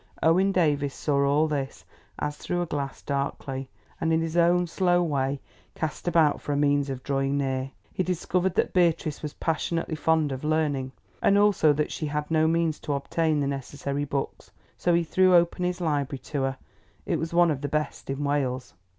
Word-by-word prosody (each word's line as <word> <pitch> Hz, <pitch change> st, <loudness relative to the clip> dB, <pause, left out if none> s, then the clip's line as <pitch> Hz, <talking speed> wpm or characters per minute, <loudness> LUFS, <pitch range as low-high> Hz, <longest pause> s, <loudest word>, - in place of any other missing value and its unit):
Owen 185 Hz, +5 st, +4 dB
Davies 145 Hz, -6 st, +1 dB
saw 140 Hz, -2 st, +1 dB
all 145 Hz, +3 st, +3 dB
this 140 Hz, -3 st, -4 dB, 0.3 s
as 150 Hz, 0 st, -2 dB
through 175 Hz, +3 st, -2 dB
a -, -, -3 dB
glass 140 Hz, -4 st, -4 dB
darkly, 140 Hz, -1 st, -3 dB, 0.3 s
and 165 Hz, -, 0 dB
in 160 Hz, -, +3 dB
his 165 Hz, 0 st, -3 dB
own 175 Hz, +1 st, +4 dB
slow 175 Hz, 0 st, +2 dB
way 140 Hz, -3 st, -1 dB, 0.4 s
cast 160 Hz, +2 st, -4 dB
about 160 Hz, -4 st, +3 dB
for 145 Hz, -, -2 dB
a -, -, 0 dB
means 145 Hz, -1 st, +2 dB
of 130 Hz, -1 st, -5 dB
drawing 135 Hz, 0 st, 0 dB
near. 135 Hz, -1 st, -1 dB, 0.2 s
He -, -, -1 dB
discovered 180 Hz, +1 st, 0 dB
that -, -, +1 dB
Beatrice 165 Hz, -4 st, +1 dB
was 150 Hz, -1 st, -6 dB
passionately 165 Hz, +1 st, -1 dB
fond 155 Hz, -1 st, +1 dB
of 130 Hz, +1 st, -5 dB
learning, 150 Hz, -4 st, 0 dB, 0.3 s
and 200 Hz, -, +4 dB
also 205 Hz, -7 st, +4 dB
that 150 Hz, +1 st, -1 dB
she 155 Hz, -, -3 dB
had 150 Hz, +1 st, -3 dB
no 160 Hz, 0 st, +3 dB
means 165 Hz, -1 st, +1 dB
to 145 Hz, -, -3 dB
obtain 155 Hz, +2 st, 0 dB
the -, -, +1 dB
necessary 140 Hz, +1 st, -3 dB
books. 140 Hz, -1 st, -4 dB, 0.3 s
So 175 Hz, -1 st, +2 dB
he 170 Hz, -, +2 dB
threw 185 Hz, +2 st, +4 dB
open 175 Hz, +1 st, +3 dB
his 180 Hz, 0 st, -1 dB
library 145 Hz, -4 st, -1 dB, 0.2 s
to 140 Hz, -, +1 dB
her; 135 Hz, 0 st, -1 dB, 0.5 s
it 170 Hz, -, 0 dB
was 160 Hz, +2 st, -3 dB
one 170 Hz, -1 st, +4 dB
of 140 Hz, -3 st, -3 dB
the 145 Hz, -, -3 dB
best 150 Hz, -1 st, -3 dB
in 135 Hz, +1 st, -2 dB
Wales. 140 Hz, -3 st, -1 dB
150 Hz, 195 wpm, -26 LUFS, 140-170 Hz, 0.5 s, Owen